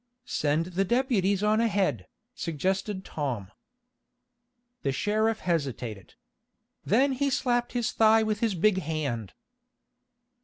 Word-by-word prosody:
"Send 150 -2 0
the 195 +3 +2
deputies 205 -4 +1
on 215 +1 +3
ahead," 195 - 0 0.3
suggested 190 - -2
Tom. 120 -10 -4 1.3
The 135 - 0
sheriff 215 +9 0
hesitated. 130 - -3 0.7
Then 265 +7 +3
he 280 +2 0
slapped 245 -2 0
his 240 -3 0
thigh 220 0 +5
with 215 -1 -1
his 225 -4 0
big 190 +2 +3
hand. 140 - -3
195 Hz, 110 wpm, -27 LUFS, 150-225 Hz, 1.3 s, thigh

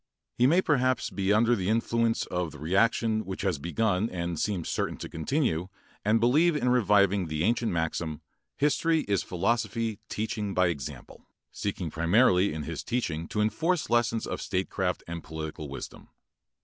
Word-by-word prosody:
He 125 - +3
may 175 +6 +4
perhaps 130 -4 +1
be 100 0 0
under 115 +3 +4
the 95 -3 -2
influence 115 +1 +1
of 90 -3 -3
the - - -10
reaction 110 +7 +1
which 95 0 -5
has 95 -7 0
begun 100 +6 0
and 85 -2 -3
seems 95 -6 -1
certain - - -2
to - - -6
continue 90 - -1 0.4
and 110 +2 +3
believe 150 +8 +4
in 125 -4 +1
reviving 100 -5 +3
the 75 0 -2
ancient 115 +3 +1
maxim, 80 -2 -2 0.4
"history 160 +2 +2
is 100 -6 0
philosophy 110 +3 -1
teaching 105 -2 -3
by 90 -1 +3
example," 70 -7 -7 0.2
seeking 95 -5 -3
primarily 90 +3 +3
in 75 0 -4
his - - -5
teaching 85 -10 -2
to 105 - -1
enforce 160 +8 0
lessons 115 -1 +2
of - - -4
statecraft 95 -1 -2
and 85 -1 -6
political 80 -1 -6
wisdom. 70 - -8
100 Hz, 160 wpm, -28 LUFS, 85-115 Hz, 0.4 s, may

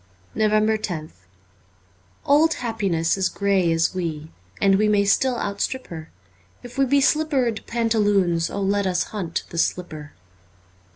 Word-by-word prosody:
349 215 0 +1
NOVEMBER - - -10
loth 90 0 -31 1.0
OLD 310 +3 +4
happiness 200 -9 -1
is 185 - +1
grey 195 -4 +1
as 165 +2 +1
we 160 -4 -4 0.3
And 195 -1 +3
we 215 - +3
may 205 -1 +3
still 250 +5 +2
outstrip 230 +6 -3
her; 160 -2 -8 0.5
If 245 0 -11
we 270 - +4
be 280 +2 +3
slippered 275 -6 +1
pantaloons 205 -7 +1
let 200 0 0
us 180 -1 +1
hunt 180 -6 -3
the 170 - -3
slipper 155 -5 -3
200 Hz, 135 wpm, -23 LUFS, 170-230 Hz, 1.0 s, OLD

